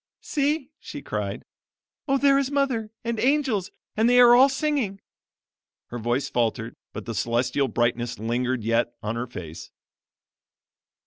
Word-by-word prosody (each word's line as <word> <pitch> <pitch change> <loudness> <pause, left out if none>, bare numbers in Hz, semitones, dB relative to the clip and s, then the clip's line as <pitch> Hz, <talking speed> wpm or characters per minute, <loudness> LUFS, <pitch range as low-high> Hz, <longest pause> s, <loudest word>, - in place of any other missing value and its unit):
"See!" 295 -1 -1
she - - -9
cried; - - -4 0.6
"Oh, 275 0 +3
there 275 0 +4
is 275 -1 -1
mother! 270 -6 0
and 235 -1 -2
angels! 255 -8 +1 0.3
and 225 +2 +3
they 245 0 +5
are 240 -1 +8
all 265 +3 +7
singing." 270 -8 -1 0.9
Her 120 - -5
voice 120 +4 -1
faltered, 115 0 -1 0.2
but - - -7
the 115 - -4
celestial 120 +6 0
brightness 120 +1 -1
lingered 120 +2 -1
yet 115 +1 0
on 105 +2 -2
her 120 +2 -3
face. 85 -8 -9
145 Hz, 140 wpm, -25 LUFS, -, 0.9 s, are